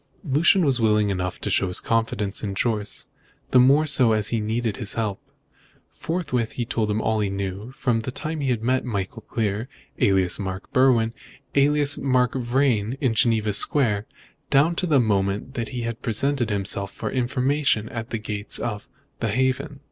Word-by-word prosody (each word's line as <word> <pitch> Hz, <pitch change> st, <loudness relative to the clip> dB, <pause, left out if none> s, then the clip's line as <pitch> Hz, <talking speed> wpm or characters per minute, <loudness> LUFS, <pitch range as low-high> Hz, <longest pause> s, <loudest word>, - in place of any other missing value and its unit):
Lucian 165 Hz, +4 st, +3 dB
was 130 Hz, -4 st, +1 dB
willing 105 Hz, -2 st, +3 dB
enough 90 Hz, -1 st, -3 dB
to -, -, -4 dB
show 95 Hz, -, +2 dB
his 90 Hz, -, -1 dB
confidence 110 Hz, -3 st, -1 dB
in 100 Hz, -2 st, -3 dB
Jorce, 105 Hz, -1 st, -1 dB, 0.5 s
the 130 Hz, -, +6 dB
more 140 Hz, +5 st, +5 dB
so 130 Hz, -6 st, +4 dB
as 105 Hz, -2 st, 0 dB
he 115 Hz, -, 0 dB
needed 110 Hz, 0 st, -2 dB
his 110 Hz, -, -2 dB
help. 105 Hz, -4 st, -2 dB, 0.7 s
Forthwith 145 Hz, -10 st, -2 dB
he 120 Hz, -, -3 dB
told 110 Hz, -2 st, -1 dB
him 105 Hz, +1 st, 0 dB
all 110 Hz, 0 st, 0 dB
he 105 Hz, -2 st, 0 dB
knew, 100 Hz, +3 st, -4 dB
from 125 Hz, -4 st, 0 dB
the 115 Hz, -, -4 dB
time 155 Hz, +5 st, -5 dB
he 140 Hz, -2 st, -1 dB
had 115 Hz, -3 st, -1 dB
met 130 Hz, +2 st, +1 dB
Michael 100 Hz, -6 st, -4 dB
Clear, 110 Hz, +1 st, -2 dB, 0.3 s
alias 95 Hz, -1 st, +2 dB
Mark 95 Hz, 0 st, -5 dB
Berwin, 125 Hz, -4 st, +3 dB, 0.4 s
alias 145 Hz, 0 st, +3 dB
Mark 125 Hz, -2 st, +2 dB
Vrain, 125 Hz, -2 st, 0 dB
in 130 Hz, -5 st, +1 dB
Geneva 110 Hz, -3 st, +2 dB
Square, 110 Hz, -3 st, +1 dB, 0.4 s
down 150 Hz, +5 st, +4 dB
to 180 Hz, +2 st, -1 dB
the 150 Hz, -4 st, +4 dB
moment 100 Hz, +2 st, 0 dB
he 120 Hz, +2 st, -5 dB
had 115 Hz, -1 st, -4 dB
presented 125 Hz, +1 st, 0 dB
himself 100 Hz, -1 st, -1 dB
for -, -, -5 dB
information 130 Hz, -2 st, +1 dB
at 115 Hz, -1 st, -6 dB
the 115 Hz, -, -2 dB
gates 105 Hz, -1 st, -2 dB
of 105 Hz, -4 st, -4 dB, 0.3 s
"The 115 Hz, -, -1 dB
Haven." 130 Hz, +5 st, -1 dB
115 Hz, 175 wpm, -24 LUFS, 105-130 Hz, 0.7 s, the